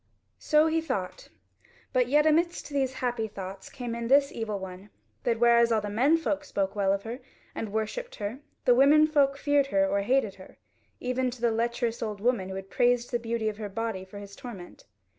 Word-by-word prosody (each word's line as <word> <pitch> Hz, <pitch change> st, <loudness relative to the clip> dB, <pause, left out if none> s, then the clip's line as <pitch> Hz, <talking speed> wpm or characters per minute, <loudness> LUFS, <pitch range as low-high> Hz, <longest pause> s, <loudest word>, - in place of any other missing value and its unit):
So 305 Hz, 0 st, +4 dB
he 320 Hz, 0 st, +1 dB
thought; 195 Hz, -, -4 dB, 0.6 s
but 250 Hz, -1 st, +3 dB
yet 295 Hz, +4 st, +4 dB
amidst 335 Hz, +2 st, +1 dB
these 275 Hz, -3 st, 0 dB
happy 240 Hz, -3 st, -1 dB
thoughts 195 Hz, -2 st, -8 dB
came 245 Hz, -3 st, -5 dB
in 235 Hz, 0 st, -3 dB
this 275 Hz, +2 st, +4 dB
evil 220 Hz, -3 st, -3 dB
one, 190 Hz, +1 st, -9 dB, 0.3 s
that 230 Hz, -2 st, 0 dB
whereas 235 Hz, 0 st, +5 dB
all 225 Hz, -, +3 dB
the 205 Hz, -1 st, -5 dB
men 270 Hz, +10 st, +4 dB
folk 295 Hz, -3 st, -2 dB
spoke 195 Hz, -7 st, -2 dB
well 195 Hz, -2 st, +2 dB
of 200 Hz, 0 st, -1 dB
her 235 Hz, +3 st, -6 dB, 0.3 s
and 220 Hz, -2 st, -5 dB
worshipped 220 Hz, -, -3 dB
her, 210 Hz, +5 st, -5 dB, 0.3 s
the 245 Hz, -, +6 dB
women 285 Hz, +5 st, +6 dB
folk 285 Hz, -3 st, +2 dB
feared 285 Hz, -1 st, +2 dB
her 195 Hz, -6 st, +2 dB
or 200 Hz, +1 st, +1 dB
hated 220 Hz, -1 st, +1 dB
her; -, -, -15 dB, 0.4 s
even 255 Hz, 0 st, -1 dB
to 245 Hz, 0 st, -9 dB
the 235 Hz, -1 st, +3 dB
lecherous 235 Hz, +1 st, -1 dB
old 210 Hz, -2 st, -3 dB
woman 215 Hz, -4 st, 0 dB
who 190 Hz, -, -5 dB
had 195 Hz, 0 st, -8 dB
praised 245 Hz, 0 st, +2 dB
the 240 Hz, -, 0 dB
beauty 230 Hz, -1 st, -2 dB
of 210 Hz, -1 st, -2 dB
her 210 Hz, -2 st, -5 dB
body 225 Hz, -2 st, -3 dB
for 190 Hz, +2 st, -12 dB
his 200 Hz, 0 st, -10 dB
torment. 235 Hz, -, -10 dB
235 Hz, 205 wpm, -28 LUFS, 205-270 Hz, 0.6 s, the